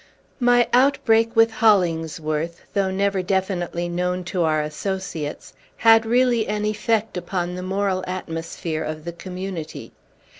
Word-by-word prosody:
My 245 -1 +4
outbreak 230 -3 +3
with 225 0 +5
Hollingsworth, 165 -6 +1
though 195 -2 +1
never 195 0 0
definitely 180 -2 -1
known 180 +1 -1
to 180 0 -2
our 155 -2 +2
associates, 160 -1 -5 0.2
had 225 0 +5
really 240 -1 +3
an 210 0 -1
effect 215 0 0
upon 175 0 -3
the 180 - -5
moral 190 0 -1
atmosphere 165 -3 -4
of 155 0 -5
the 170 - -5
Community. 180 -2 -7
185 Hz, 125 wpm, -22 LUFS, 170-215 Hz, 0.2 s, with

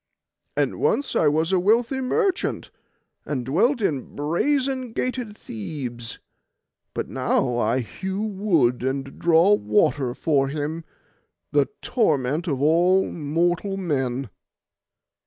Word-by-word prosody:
And - - 0
once 285 - +1
I 155 - +4
was 160 +4 +2
a 190 - +3
wealthy 230 +7 +2
merchant, 385 - 0 0.5
and 130 -5 -3
dwelt 225 - +2
in 145 -10 -2
brazen 255 - 0
gated 245 -5 -3
Thebes; 120 +1 -6 0.8
but - - -2
now 125 -2 0
I 120 +3 +1
hew 190 - -4
wood 185 - +1
and 135 +1 -3
draw 170 +4 +5
water 150 -11 +1
for 140 -3 +1
him, 155 +3 -4 0.7
the - - +3 0.2
torment 155 - +1
of 140 -3 -1
all 175 +5 +3
mortal 175 +5 0
men. 135 - -2
165 Hz, 115 wpm, -24 LUFS, 135-205 Hz, 0.8 s, draw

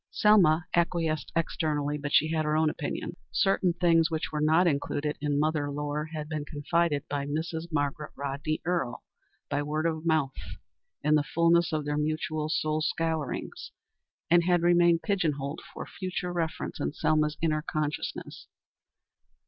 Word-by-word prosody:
Selma 180 -6 +4
acquiesced 165 -3 0
externally, 150 -3 0
but 145 -1 -4
she 155 +2 +4
had 160 -1 +1
her 150 0 +1
own 155 -1 +3
opinions. - - -4 0.2
Certain 195 -3 +2
things 165 -2 +3
which 160 -1 -2
were 150 -1 -2
not 160 +4 +4
included 150 -1 0
in 145 -1 0
"Mother 150 -1 0
Lore," 145 +1 -3
had 155 -1 -6
been 155 -1 -3
confided 150 0 0
by 140 -1 -3
Mrs. 160 +2 -3
Margaret 150 +1 -2
Rodney 140 +3 -3
Earle 170 -9 -1 0.4
by 145 0 -1
word 155 +2 -2
of 160 -1 -1
mouth 155 -5 +1 0.7
in 150 +1 +3
the 150 - +5
fulness 170 +1 +3
of 155 -2 -1
their 150 0 -1
mutual 155 0 -1
soul 155 -1 0
scourings, 160 0 -2 0.6
and 170 +1 +4
had 175 -1 +3
remained 175 -1 +4
pigeon 195 -7 +1
holed 140 +3 -5
for - - -7
future 180 -1 -4
reference 165 -2 -3
in 70 - -2
Selma's 150 -1 +1
inner 155 -2 +1
consciousness. 150 -1 -4
155 Hz, 155 wpm, -28 LUFS, 150-165 Hz, 0.7 s, the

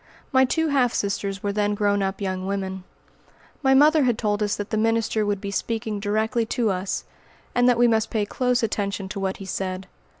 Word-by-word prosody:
My 260 0 +5
two 320 +5 0
half 255 -4 +2
sisters 200 -1 -2
were 205 - 0
then 205 0 +1
grown 205 -1 +1
up 195 +1 -2
young 185 -1 -2
women. 190 -1 -3 0.8
My 265 -1 +4
mother 305 +3 +6
had 240 -3 +2
told 210 -2 -1
us 205 -1 +1
that 205 0 -6
the - - +1
minister 225 -1 +1
would 205 -1 0
be 200 0 -5
speaking 220 0 -2
directly 220 +3 0
to 230 -3 0
us, 185 +1 -2 0.5
and 245 0 +4
that 245 - +3
we 240 0 +5
must 225 -1 +1
pay 215 -2 0
close 250 +2 0
attention 200 -3 -2
to 200 - -5
what 190 -1 -2
he 195 - -8
said. 185 0 -3
210 Hz, 205 wpm, -24 LUFS, 200-235 Hz, 0.8 s, mother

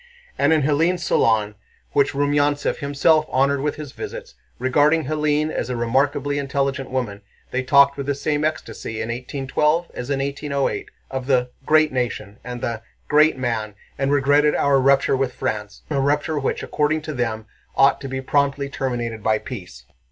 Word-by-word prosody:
And - - +2
in 155 -3 +3
Hélène's 165 +5 +1
salon, 105 -2 +2 0.4
which 140 0 +2
Rumyántsev 145 +1 +1
himself 155 +2 +2
honored 135 +1 +2
with 150 +1 -1
his 150 -3 -8
visits, 485 - -8 0.2
regarding 145 +5 +2
Hélène 150 +1 0
as - - -3
a 125 - -2
remarkably 140 +4 0
intelligent 140 -1 -2
woman, 120 -6 -3 0.3
they 125 - 0
talked 140 +2 +5
with 140 -1 -4
the 140 - 0
same 145 +1 -1
ecstasy 155 -8 -3
in 110 +1 -3
1812 140 +7 -1
as 125 - -6
in 140 - +1
1808 140 0 -2 0.2
of 130 -1 -4
the 125 -2 +2 0.2
"great 155 0 +4
nation" 120 -5 -3
and 125 -1 -6
the 115 -2 -3 0.3
"great 150 -1 +4
man," 115 -5 -2 0.2
and 135 0 -1
regretted 145 +1 +3
our 140 -1 +3
rupture 135 +1 +3
with 130 -1 -1
France, 105 -6 -4
a 140 - +1
rupture 145 +2 +1
which, 135 - -2
according 150 +1 0
to 155 - -5
them, 115 -4 -2 0.3
ought 135 - +4
to 135 - -5
be 130 0 -3
promptly 140 0 0
terminated 120 -5 -3
by 110 +1 +2
peace. 90 - -9
140 Hz, 165 wpm, -22 LUFS, 125-145 Hz, 0.4 s, talked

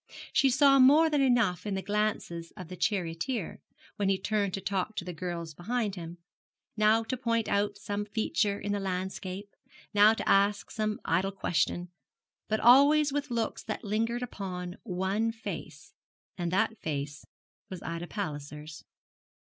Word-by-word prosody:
She 270 - +4
saw 275 +1 +5
more 300 +5 +6
than 295 -2 +3
enough 235 -8 +2
in 200 - -1
the 190 - -3
glances 205 -5 -1
of 180 -3 -8
the 185 - -6
charioteer, 180 +4 -2 0.4
when 200 -1 +1
he 195 - +3
turned 200 0 0
to - - -4
talk 195 +2 -2
to 175 - -4
the 180 - -5
girls 170 -1 -5
behind 215 +5 -2
him 170 -2 -7 0.6
now 215 +1 +4
to 240 +3 -3
point 230 -3 0
out 200 0 0
some 205 0 -3
feature 205 -1 0
in 205 - -3
the 205 - 0
landscape, 190 +1 -4 0.4
now 210 +2 +6
to - - -4
ask 200 +1 +3
some 215 +1 -2
idle 185 +4 +1
question, 175 -2 -1 0.6
but 215 0 0
always 285 +4 +6
with 290 0 -2
looks 230 -2 -2
that 215 - -4
lingered 230 +4 -1
upon 180 -5 -5
one 195 +3 -1
face, 225 -1 -8 0.4
and 175 -2 -2
that 220 +4 +1
face 145 -1 -4 0.5
was 185 -2 -7
Ida 170 +1 -4
Palliser's. 150 -5 -6
205 Hz, 155 wpm, -29 LUFS, 180-225 Hz, 0.6 s, more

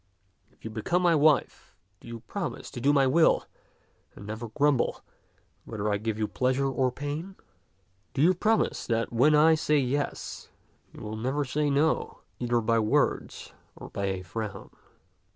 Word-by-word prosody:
If - - -21
you 110 - -5
become 170 +12 -1
my 175 -1 +4
wife, 150 - +2 0.2
do - - -15
you 115 -1 -8
promise 195 - -5
to 125 - -7
do 140 +4 +4
my 140 -2 +4
will 160 +5 +3 0.7
and 100 - -11
never 110 +3 -5
grumble, 140 +3 +1 0.6
whether 105 -2 -3
I - - +1
give 110 +1 -3
you 110 -1 -1
pleasure 130 +3 0
or 130 -1 0
pain? 145 +8 -5 0.8
Do 140 - +2
you 180 +3 +5
promise 215 +5 0
that 115 0 -1
when 140 +6 +4
I 155 +2 +6
say 150 -1 +2
yes, 140 +1 -2 0.4
you - - -12
will 110 0 -5
never 135 +6 -1
say 145 +3 0
no, 145 +3 0 0.2
either 120 -1 +1
by 115 +1 +2
words 110 -1 0 0.2
or - - -11
by 100 - -3
a 95 -1 -2
frown 105 +3 -6
130 Hz, 165 wpm, -27 LUFS, 110-150 Hz, 0.8 s, I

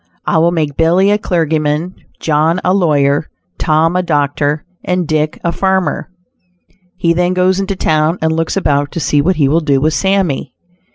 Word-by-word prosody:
I 165 - +2
will 165 +1 +3
make 155 -4 -2
Billy 180 +5 +3
a 210 - +2
clergyman; 160 -1 -1 0.3
John 160 +3 +1
a 185 - +2
lawyer; 150 -6 +1 0.3
Tom 160 +2 +1
a 180 - +2
doctor, 145 -2 -1 0.2
and 180 -2 -1
Dick 155 0 -1
a 170 - 0
farmer." 190 -4 -1 0.9
He 170 -2 +1
then 180 +1 0
goes 185 +1 +2
into 195 0 -2
town 155 0 +1
and 160 0 0
looks 165 +3 -1
about 145 -6 0
to - - -3
see 145 -1 +1
what 180 +5 +1
he 145 -4 +2
will 155 +4 +2
do 145 -4 +1
with 155 +3 +1
Sammy. 190 -10 -1
160 Hz, 175 wpm, -14 LUFS, 150-180 Hz, 0.9 s, will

